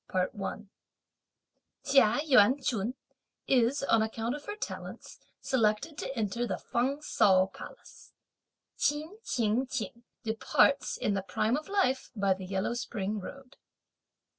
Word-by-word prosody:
Chia 270 -2 +4
Yuan 260 -2 +5
ch'un 240 -2 -1 0.5
is, 260 +2 +2
on 225 -5 +3
account 225 +2 -2
of 295 0 -7
her 415 - -5
talents, 425 - -7 0.2
selected 240 +5 +1
to 265 - -5
enter 230 +3 -1
the - - -2
Feng 265 +5 -1
Ts'ao 190 -9 +3
Palace. - - -12 0.7
Ch'in 310 +8 -1
Ching 235 - 0
ch'ing 235 -2 -4 0.2
departs, 225 +5 +2
in 210 - 0
the 195 - 0
prime 205 +5 0
of 305 +4 -5
life, 370 -10 +1
by 200 -2 +2
the 185 0 -8
yellow 190 +4 -1
spring 215 -3 -3
road. 270 +6 -10
240 Hz, 125 wpm, -30 LUFS, 210-275 Hz, 0.7 s, Yuan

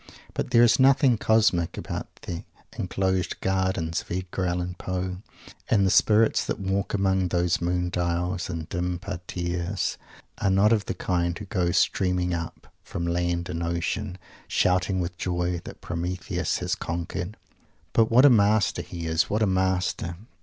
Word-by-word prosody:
But - - -2
there 120 -1 +6
is 120 - +5
nothing 135 -1 +5
"cosmic" 105 -7 +2
about - - -4 0.2
the 85 -1 -5 0.3
enclosed 95 -1 -1
gardens 95 -3 0
of - - -19
Edgar 90 +1 -2
Allen 90 0 -2
Poe; 90 0 -3 0.5
and 100 -3 +4
the 95 - +3
spirits 110 +1 +4
that - - -2
walk 95 +1 -1
among 95 -2 +2
those 90 0 +1
Moon 90 +1 0
dials 90 +1 -1
and 80 -3 -4
dim 90 0 -2
Parterres 85 +1 -3 0.4
are 100 - +1
not 100 +4 +4
of 105 -2 +1
the - - -3
kind 85 -2 -1
who 105 - -7
go 90 -4 0
streaming 90 -1 +1
up, 85 0 -6
from 85 - -4
land 85 0 0
and 85 -1 -4
ocean, 85 +3 -2 0.3
shouting 95 +1 +2
with 90 0 -5
joy 90 -1 -1
that - - -10
Prometheus 90 +2 -2
has - - -2
conquered! 85 +3 -4 0.6
But 115 -1 +4
what 125 +4 +6
a - - +9
master 105 -2 +3
he 85 -3 -7
is 80 -1 +1
what 110 +2 +1
a - - +5
master! 95 -2 0
90 Hz, 160 wpm, -26 LUFS, 85-95 Hz, 0.6 s, a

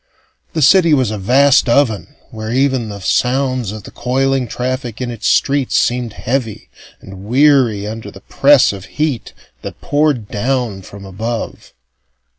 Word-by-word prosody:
The 160 - 0
city 165 +1 +5
was 130 -6 0
a 105 - -4
vast 130 +6 +3
oven 125 +1 +1 0.2
where 110 -1 -6
even 130 -3 0
the 100 -1 -8
sounds 125 +2 0
of 105 -1 -8
the - - -11
coiling 130 +1 -1
traffic 125 -1 -4
in 125 -1 -3
its 115 -1 -4
streets 140 -2 +1
seemed 120 -2 0
heavy 120 -2 -4 0.3
and 95 0 -11
weary 125 -4 +3
under 110 0 -6
the 95 - -14
press 140 -3 +3
of 95 -1 -9
heat 150 -7 -2 0.3
that - - -8
poured 145 -7 0
down 120 -2 -2
from 100 +1 -12
above. 110 +5 -6
125 Hz, 150 wpm, -16 LUFS, 110-135 Hz, 0.3 s, city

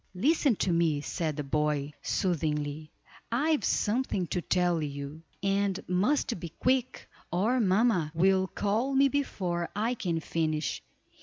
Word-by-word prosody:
"Listen 275 - +3
to 190 - 0
me," 165 -3 +2
said 155 0 -2
the 150 - -2
boy, 150 0 -1
soothingly; 155 -4 -1 0.4
"I 285 +7 +2
have 305 - +1
something 210 -4 0
to 180 - -1
tell 175 -2 +1
you, 140 +1 -5 0.2
and 195 -1 +1
must 210 +4 +1
be 170 - -6
quick, 255 +8 -1 0.2
or 215 +9 +2
mamma 195 -5 +2
will 190 +2 +3
call 220 +9 -1
me 275 +1 +5
before 180 -12 -2
I 225 +4 0
can 175 -8 -2
finish. 155 -1 -1
180 Hz, 140 wpm, -29 LUFS, 155-230 Hz, 0.4 s, me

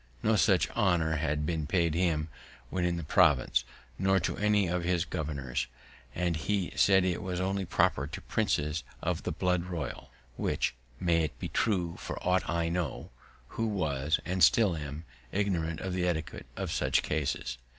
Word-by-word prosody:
No 110 - +4
such 95 -3 +4
honour 85 -7 +2
had 75 -1 -1
been 80 -2 -1
paid 85 -1 +2
him 80 -2 +1 0.4
when 90 -1 0
in 85 -1 0
the 85 - -4
province, 65 -3 +4 0.4
nor 95 0 +3
to - - -1
any 105 -1 +3
of 90 0 -1
his 90 -1 +1
governors; 70 -6 -3 0.5
and 90 -1 0
he 95 +3 -1
said 95 -2 +5
it 90 -2 0
was 90 -1 -3
only 95 +1 -1
proper 70 -4 +2
to - - -7
princes 75 +2 0 0.2
of - - 0
the - - -3
blood 90 -1 0
royal, 85 -7 -5 0.3
which - - 0 0.3
may 85 -3 +2
be - - -5
true 90 -7 0
for - - -5
aught 90 +1 +2
I 85 -1 +1
know, 85 -8 -3 0.4
who 115 - -2
was, 80 -7 0
and 95 0 +1
still 105 -7 +5
am, 75 +1 -6 0.3
ignorant 85 -5 0
of 95 -1 -3
the 90 -1 0
etiquette 80 -3 -3
in - - -2
such - - +1
cases. 75 -4 -2
85 Hz, 170 wpm, -30 LUFS, 80-95 Hz, 0.5 s, said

